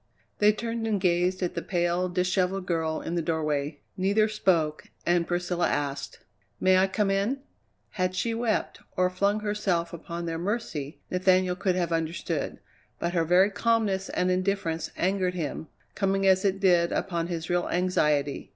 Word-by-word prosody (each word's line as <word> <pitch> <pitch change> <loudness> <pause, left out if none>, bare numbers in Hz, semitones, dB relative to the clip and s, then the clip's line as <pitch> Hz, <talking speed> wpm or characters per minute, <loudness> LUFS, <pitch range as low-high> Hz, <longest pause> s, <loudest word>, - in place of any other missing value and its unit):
They 210 0 +6
turned 230 +1 -3
and 210 -3 +1
gazed 180 0 +1
at 175 - -1
the - - -3
pale, 175 0 0
dishevelled 180 +1 0
girl 160 -2 -1
in 165 - -4
the 175 - 0
doorway. 150 -2 -1
Neither 200 +3 +2
spoke 170 -8 +1 0.2
and 175 -1 +2
Priscilla 175 0 0
asked: 140 -1 -2 0.4
"May 185 0 +5
I 190 - +4
come 195 +1 0
in?" 205 +8 0 0.5
Had 185 -2 -1
she 230 +5 0
wept, 225 -2 -1 0.2
or 180 0 +3
flung 200 +3 +1
herself 205 -5 -1
upon 170 +1 -6
their 165 -1 -3
mercy, 170 -7 -3
Nathaniel 185 0 +3
could 185 0 0
have 175 -2 -1
understood, 165 +1 -2 0.4
but 170 0 -2
her 170 -2 +2
very 180 +5 +4
calmness 210 -4 +1
and 180 0 +1
indifference 185 -3 -1
angered 185 0 0
him, 160 -1 -4 0.3
coming 195 -1 0
as 190 -1 +4
it 195 -1 +1
did 175 -3 +4
upon 170 -3 -1
his 170 -1 -4
real 175 0 +1
anxiety. 150 -6 +1
180 Hz, 160 wpm, -27 LUFS, 170-195 Hz, 0.5 s, They